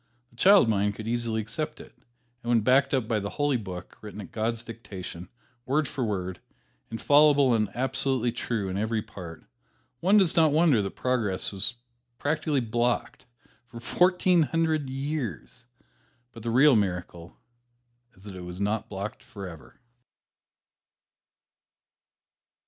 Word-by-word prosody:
The -, -, -23 dB
child 195 Hz, -, +6 dB
mind 105 Hz, -2 st, +1 dB
could 110 Hz, +1 st, -7 dB
easily 115 Hz, -1 st, -1 dB
accept 150 Hz, +8 st, -5 dB
it, -, -, -13 dB, 0.5 s
and 120 Hz, -, -6 dB
when 120 Hz, -2 st, +4 dB
backed 135 Hz, +5 st, +3 dB
up 130 Hz, -5 st, 0 dB
by 110 Hz, -1 st, +1 dB
the 100 Hz, 0 st, -4 dB
Holy 145 Hz, +2 st, 0 dB
Book, 95 Hz, -5 st, -8 dB
written 105 Hz, -1 st, -9 dB
at 100 Hz, -, -9 dB
God's 115 Hz, +1 st, -2 dB
dictation, 95 Hz, -6 st, -8 dB, 0.4 s
word 145 Hz, +2 st, +1 dB
for 130 Hz, -, -3 dB
word, 95 Hz, -5 st, -3 dB, 0.5 s
infallible 145 Hz, +2 st, +4 dB
and 110 Hz, -3 st, +1 dB
absolutely 130 Hz, -1 st, 0 dB
true 115 Hz, -3 st, -3 dB
in 95 Hz, +1 st, -3 dB
every 110 Hz, 0 st, -1 dB
part, 85 Hz, -4 st, -10 dB, 0.5 s
one 195 Hz, +7 st, +4 dB
does 190 Hz, -5 st, +4 dB
not 160 Hz, -2 st, +5 dB
wonder 150 Hz, -7 st, +4 dB
that 100 Hz, -, -5 dB
progress 115 Hz, -7 st, 0 dB
was 100 Hz, +5 st, -1 dB, 0.4 s
practically 150 Hz, -1 st, 0 dB
blocked 120 Hz, +2 st, -1 dB, 0.4 s
for 120 Hz, -1 st, -10 dB
fourteen 180 Hz, +5 st, +3 dB
hundred 155 Hz, -2 st, 0 dB
years, 130 Hz, -, -5 dB, 0.7 s
but 115 Hz, -, -11 dB
the 115 Hz, -, -3 dB
real 135 Hz, +4 st, +6 dB
miracle 90 Hz, -4 st, -3 dB, 0.8 s
is 95 Hz, -, -20 dB
that 100 Hz, -2 st, -9 dB
it 90 Hz, -, -8 dB
was 90 Hz, +1 st, -8 dB
not 105 Hz, +2 st, -1 dB
blocked 100 Hz, +2 st, -6 dB
forever. 95 Hz, -6 st, -10 dB
115 Hz, 140 wpm, -27 LUFS, 100-140 Hz, 0.8 s, child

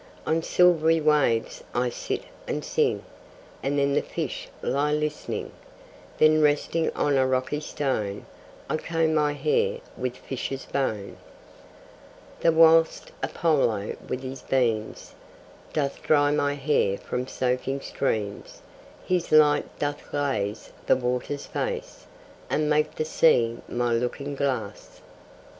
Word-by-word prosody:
On 160 Hz, +1 st, +1 dB
silvery 165 Hz, -2 st, +4 dB
waves 150 Hz, -7 st, +2 dB
I 120 Hz, 0 st, +1 dB
sit -, -, -4 dB, 0.2 s
and -, -, -3 dB
sing, -, -, +1 dB, 0.6 s
And 140 Hz, +1 st, -1 dB
then 140 Hz, 0 st, +2 dB
the -, -, +3 dB
fish -, -, -5 dB, 0.2 s
lie 145 Hz, +2 st, +1 dB
listening: 150 Hz, 0 st, -3 dB, 0.7 s
Then 155 Hz, 0 st, +5 dB
resting 150 Hz, +2 st, +2 dB
on 145 Hz, -2 st, +2 dB
a 130 Hz, 0 st, +3 dB
rocky 130 Hz, +3 st, 0 dB
stone 110 Hz, -10 st, -2 dB, 0.4 s
I -, -, 0 dB
comb 165 Hz, 0 st, 0 dB
my 150 Hz, -1 st, +2 dB
hair 470 Hz, -, +1 dB, 0.2 s
with 125 Hz, -1 st, -3 dB
fishes' 135 Hz, 0 st, -5 dB
bone; 110 Hz, -8 st, -2 dB, 1.2 s
The 165 Hz, -, +4 dB
whilst 165 Hz, 0 st, +5 dB
Apollo 135 Hz, -11 st, +1 dB
with 130 Hz, +1 st, -3 dB
his 130 Hz, 0 st, -6 dB
beams 115 Hz, -5 st, -1 dB, 0.6 s
Doth 140 Hz, -3 st, -2 dB
dry 145 Hz, -1 st, +3 dB
my 145 Hz, -1 st, +1 dB
hair 135 Hz, -9 st, +1 dB
from 125 Hz, +1 st, -4 dB
soaking 130 Hz, +2 st, -1 dB
streams, 105 Hz, -8 st, -3 dB, 0.4 s
His 180 Hz, -2 st, 0 dB
light 150 Hz, -1 st, +4 dB
doth 145 Hz, 0 st, -3 dB
glaze 115 Hz, -8 st, -2 dB, 0.2 s
the -, -, +6 dB
water's 125 Hz, +3 st, -2 dB
face, -, -, -4 dB, 0.4 s
And 155 Hz, -, +1 dB
make 150 Hz, 0 st, +1 dB
the 155 Hz, -, -1 dB
sea 120 Hz, -8 st, +3 dB
my 120 Hz, -1 st, 0 dB
looking 125 Hz, +4 st, -2 dB
glass. 130 Hz, -7 st, -3 dB
145 Hz, 125 wpm, -26 LUFS, 125-155 Hz, 1.2 s, the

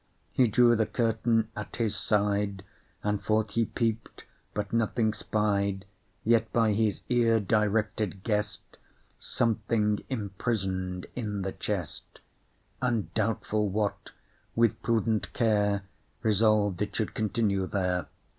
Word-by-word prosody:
He 125 Hz, -, +4 dB
drew 120 Hz, +2 st, +5 dB
the 110 Hz, -1 st, +1 dB
curtain 115 Hz, -1 st, +1 dB
at -, -, -6 dB
his 115 Hz, -3 st, 0 dB
side, 100 Hz, -2 st, 0 dB, 0.4 s
And 105 Hz, -1 st, -1 dB
forth 110 Hz, -1 st, +1 dB
he 115 Hz, +2 st, +2 dB
peep'd, 115 Hz, 0 st, -2 dB, 0.3 s
but 105 Hz, 0 st, -3 dB
nothing 115 Hz, -1 st, +1 dB
spied. 100 Hz, -2 st, 0 dB, 0.4 s
Yet, 115 Hz, 0 st, +3 dB
by 115 Hz, -2 st, +3 dB
his 105 Hz, -1 st, 0 dB
ear 115 Hz, -2 st, +3 dB
directed, 105 Hz, -1 st, 0 dB
guess'd 105 Hz, -2 st, -2 dB, 0.4 s
Something 105 Hz, -2 st, 0 dB
imprison'd 95 Hz, -5 st, -2 dB
in 105 Hz, -5 st, -3 dB
the 95 Hz, -, -2 dB
chest, 95 Hz, -8 st, -5 dB, 0.6 s
And, 120 Hz, -5 st, 0 dB
doubtful 110 Hz, -1 st, 0 dB
what, 105 Hz, +1 st, -2 dB, 0.5 s
with 115 Hz, -2 st, +2 dB
prudent 110 Hz, -2 st, 0 dB
care 105 Hz, -3 st, +2 dB, 0.4 s
Resolved 105 Hz, -3 st, +3 dB
it 105 Hz, -1 st, -2 dB
should 110 Hz, -, -1 dB
continue 105 Hz, -3 st, 0 dB
there. 90 Hz, -3 st, -1 dB
105 Hz, 115 wpm, -28 LUFS, 100-115 Hz, 0.6 s, drew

